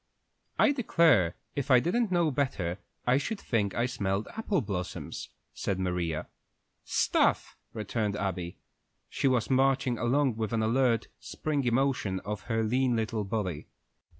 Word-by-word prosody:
"I -, -, +5 dB
declare, 165 Hz, -, +3 dB, 0.2 s
if 140 Hz, -1 st, -2 dB
I 130 Hz, -2 st, +7 dB
didn't 195 Hz, -, 0 dB
know 170 Hz, -3 st, +2 dB
better, 100 Hz, -10 st, -1 dB, 0.3 s
I 125 Hz, +2 st, +4 dB
should 205 Hz, +9 st, -3 dB
think 105 Hz, -5 st, -1 dB
I 120 Hz, -, +1 dB
smelled 100 Hz, -5 st, -1 dB
apple 215 Hz, -5 st, 0 dB
blossoms," 95 Hz, -5 st, -5 dB, 0.2 s
said 100 Hz, -, -2 dB
Maria. 90 Hz, -4 st, -2 dB, 0.6 s
"Stuff!" -, -, +1 dB, 0.2 s
returned 105 Hz, -1 st, -2 dB
Abby. 90 Hz, -4 st, -3 dB, 0.5 s
She -, -, 0 dB
was 125 Hz, -2 st, +1 dB
marching 130 Hz, -2 st, +2 dB
along 125 Hz, 0 st, +2 dB
with 110 Hz, 0 st, -2 dB
an 110 Hz, -1 st, +1 dB
alert, 115 Hz, 0 st, +2 dB
springy 145 Hz, -5 st, -2 dB
motion 120 Hz, -6 st, +1 dB
of 105 Hz, -1 st, -4 dB
her 115 Hz, -1 st, +1 dB
lean 125 Hz, +2 st, +2 dB
little 110 Hz, -1 st, -1 dB
body. 95 Hz, -6 st, -3 dB
115 Hz, 140 wpm, -29 LUFS, 100-135 Hz, 0.6 s, I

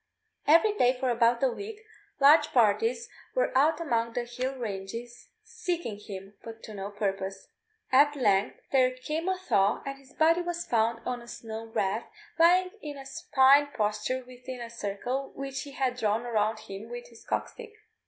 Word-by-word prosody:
Every 335 Hz, +8 st, +6 dB
day 250 Hz, -8 st, +4 dB
for 260 Hz, -1 st, +1 dB
about 235 Hz, +1 st, +3 dB
a 265 Hz, -, +5 dB
week 415 Hz, -, -7 dB, 0.4 s
large 295 Hz, +2 st, +7 dB
parties 450 Hz, -, +3 dB, 0.3 s
were -, -, +1 dB
out 300 Hz, +4 st, +4 dB
among 235 Hz, -8 st, 0 dB
the 245 Hz, -, -1 dB
hill 250 Hz, +2 st, -4 dB
ranges 230 Hz, +1 st, -6 dB
seeking 350 Hz, -, -4 dB
him, 195 Hz, -1 st, -9 dB
but 225 Hz, 0 st, -10 dB
to 215 Hz, -, -9 dB
no 200 Hz, 0 st, -5 dB
purpose. 195 Hz, -2 st, -3 dB, 0.4 s
At 290 Hz, +3 st, +5 dB
length 205 Hz, -7 st, +1 dB
there 260 Hz, -2 st, +5 dB
came 310 Hz, +7 st, -3 dB
a 375 Hz, -, 0 dB
thaw, 205 Hz, -, +1 dB
and 275 Hz, 0 st, -5 dB
his 275 Hz, -1 st, -20 dB
body 330 Hz, +2 st, +3 dB
was 345 Hz, 0 st, -3 dB
found 230 Hz, 0 st, 0 dB
on 250 Hz, -1 st, -3 dB
a 235 Hz, -, -13 dB
snow 225 Hz, -1 st, -7 dB
wreath, 215 Hz, 0 st, -1 dB, 0.3 s
lying 365 Hz, +2 st, +5 dB
in 295 Hz, -2 st, -6 dB
a 270 Hz, -, -9 dB
supine 270 Hz, +1 st, +4 dB
posture 215 Hz, +4 st, -1 dB
within 255 Hz, 0 st, -9 dB
a 235 Hz, -1 st, -7 dB
circle 235 Hz, +5 st, -3 dB
which 270 Hz, 0 st, -4 dB
he 285 Hz, -, -8 dB
had 255 Hz, -2 st, -1 dB
drawn 220 Hz, 0 st, 0 dB
around 215 Hz, -2 st, 0 dB
him 215 Hz, +1 st, -9 dB
with 240 Hz, 0 st, -7 dB
his 230 Hz, -1 st, -16 dB
cock -, -, -1 dB
stick. 455 Hz, -3 st, -11 dB
250 Hz, 175 wpm, -28 LUFS, 220-290 Hz, 0.4 s, large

